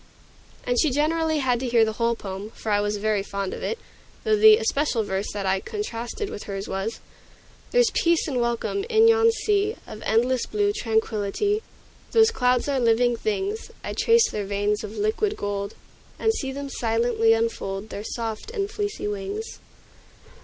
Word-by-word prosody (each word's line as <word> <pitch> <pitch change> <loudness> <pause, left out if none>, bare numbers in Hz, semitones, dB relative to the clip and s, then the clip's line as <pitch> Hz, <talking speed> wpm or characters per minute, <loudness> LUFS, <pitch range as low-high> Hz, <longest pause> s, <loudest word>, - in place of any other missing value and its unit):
And 245 -1 +1
she 310 - +4
generally 315 +3 +1
had 255 -4 +1
to 255 - -3
hear 235 -2 +4
the 220 - -2
whole 235 0 +2
poem, 195 -1 -6
for 220 - -4
I 205 0 +3
was 205 0 -1
very 210 0 +1
fond 200 -1 -4
of - - -7
it; 460 - -2 0.5
though 435 -1 +3
the 430 0 +8
especial 280 - 0
verse 195 0 -3
that 200 -1 -3
I 190 0 +2
contrasted 320 - -4
with 205 - -7
hers 195 -1 -5
was, 195 +4 -3 0.7
"There's - - +3
peace 335 -1 +2
and 260 -5 0
welcome 235 - -1
in 445 -1 +5
yon 455 0 +5
sea 420 -1 0
Of 215 - -9
endless 240 +3 +1
blue 410 -1 +1
tranquillity; 225 - 0 0.5
Those 450 0 +6
clouds 250 - +1
are 275 -2 +1
living 240 0 +3
things; 415 - -2
I - - -4
trace 460 0 +4
their 205 -1 -4
veins 205 +1 0
of 215 +1 -7
liquid 220 - 0
gold, 200 0 -3 0.4
And 445 - +2
see 270 -10 -3
them 280 +1 -5
silently 225 -1 +2
unfold 220 -3 -2
Their 205 - -6
soft 225 - -4
and 410 -3 -3
fleecy 415 - -3
wings." 205 - -5
240 Hz, 175 wpm, -24 LUFS, -, 0.7 s, the